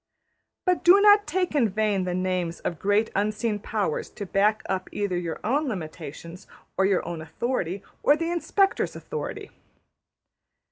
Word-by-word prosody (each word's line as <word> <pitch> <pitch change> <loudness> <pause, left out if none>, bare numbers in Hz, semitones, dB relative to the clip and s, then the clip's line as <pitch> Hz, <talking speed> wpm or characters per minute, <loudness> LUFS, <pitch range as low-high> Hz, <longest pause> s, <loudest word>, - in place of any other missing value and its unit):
'' - - -53
But 365 -1 +2
do 365 +3 +8
not 415 0 +6
take 360 +2 0
in 255 -7 +3
vain 205 -2 0
the 180 -1 -2
names 185 -2 -1
of 170 - -3
great 205 +3 +2
unseen 210 +2 0
powers 205 -6 -2
to 205 - -7
back 210 +3 +2
up 190 -1 -2
either 205 -3 -2
your 175 -2 -3
own 280 +7 +1
limitations, 170 - -7 0.3
or 190 - +2
your 195 -2 +1
own 170 -2 -4
authority, 190 - -3 0.2
or 290 - +4
the 330 +1 -2
Inspector's 390 +3 +1
authority. - - -6
205 Hz, 155 wpm, -26 LUFS, 180-270 Hz, 0.3 s, do